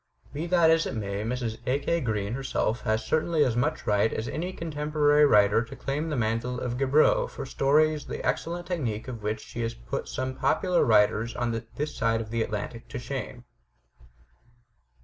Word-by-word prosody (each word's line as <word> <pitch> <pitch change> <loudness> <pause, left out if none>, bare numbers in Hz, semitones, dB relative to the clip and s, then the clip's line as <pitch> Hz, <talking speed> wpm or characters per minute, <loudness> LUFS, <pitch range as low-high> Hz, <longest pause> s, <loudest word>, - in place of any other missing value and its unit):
Be 155 +4 -3
that 170 -2 +5
as 165 0 +3
it - - -4
may, 100 -2 -3
Mrs. 115 -1 -3
A. 130 +2 +2
K. 170 +3 -1
Green 105 -3 -1
herself 125 -3 -1
has 110 -1 0
certainly 160 +2 +2
as 120 -3 0
much 145 +6 -1
right 105 +1 +2
as 110 - -3
any 175 +4 -3
contem 150 -4 -5
porary 150 -1 +5
writer 105 +1 +5
to 115 - -10
claim 150 +4 -3
the 150 - -1
mantle 120 +1 -1
of 125 0 -3
Gaboriau 140 +3 +4
for - - -7
stories 150 +3 +2
the - - -5
excellent 175 +1 -2
technique 125 - -3
of 120 -4 -6
which 105 +1 -2
should 115 -1 -4
put - - -3
some 130 0 -3
popular 180 +6 +2
writers 110 +1 +3
on 120 -1 -1 0.3
this 150 +1 -3
side 115 0 +1
of 110 -1 -6
the 115 0 0
Atlantic 110 +2 -4
to - - -6
shame." 125 -1 -5
125 Hz, 185 wpm, -27 LUFS, 110-150 Hz, 0.3 s, that